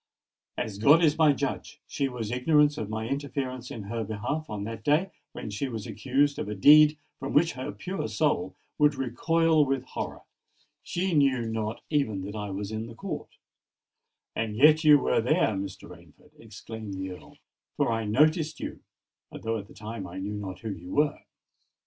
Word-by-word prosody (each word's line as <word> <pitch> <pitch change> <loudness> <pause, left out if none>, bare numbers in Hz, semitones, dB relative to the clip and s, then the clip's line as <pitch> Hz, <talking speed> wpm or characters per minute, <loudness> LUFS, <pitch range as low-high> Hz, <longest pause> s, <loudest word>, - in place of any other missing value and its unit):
As 110 -4 -4
God 150 +9 +6
is 150 -2 +4
my 155 -2 +6
judge, 140 -1 -3
she 140 - -1
was 115 -4 -5
ignorant 145 +4 +3
of 105 - -4
my 110 +1 -3
interference 135 -2 -3
in 110 - -6
her 115 +3 -3
behalf 110 +9 -3
on 105 -2 -4
that 110 0 -6
day 160 - +2 0.2
when 105 - -6
she 130 +7 -3
was 110 -4 -5
accused 140 +2 0
of - - -3
a 105 - -3
deed 150 +8 +7 0.2
from 135 - -4
which 165 +3 +4
her 130 +1 -5
pure 145 - -4
soul 95 -3 0 0.2
would 150 0 +4
recoil 155 +5 +2
with 135 -2 -1
horror:—she 180 +6 -6
knew 135 -5 +3
not 110 0 -3
even 110 -11 0
that 100 +2 -6
I 105 -1 -4
was 100 +1 -4
in 110 +1 -4
the 115 - -11
court——" - - -6 1.0
"And 110 -2 -2
yet 155 +6 +6
you 150 -1 +8
were 135 - +1
there, 120 - +2
Mr. 95 -2 -5
Rainford," 85 -3 -16
exclaimed 110 -2 -8
the 95 0 -4
Earl: 90 -3 -12 0.4
"for - - +2
I 115 -1 -1
noticed 155 - +2
you—although 115 0 -7
at 100 - -10
the - - -16
time 105 -2 -6
I 90 +1 -9
knew 100 +2 -4
not 100 -3 -6
who 110 -2 -4
you 90 -1 -7
were." 150 0 +2
115 Hz, 180 wpm, -27 LUFS, 105-145 Hz, 1.0 s, you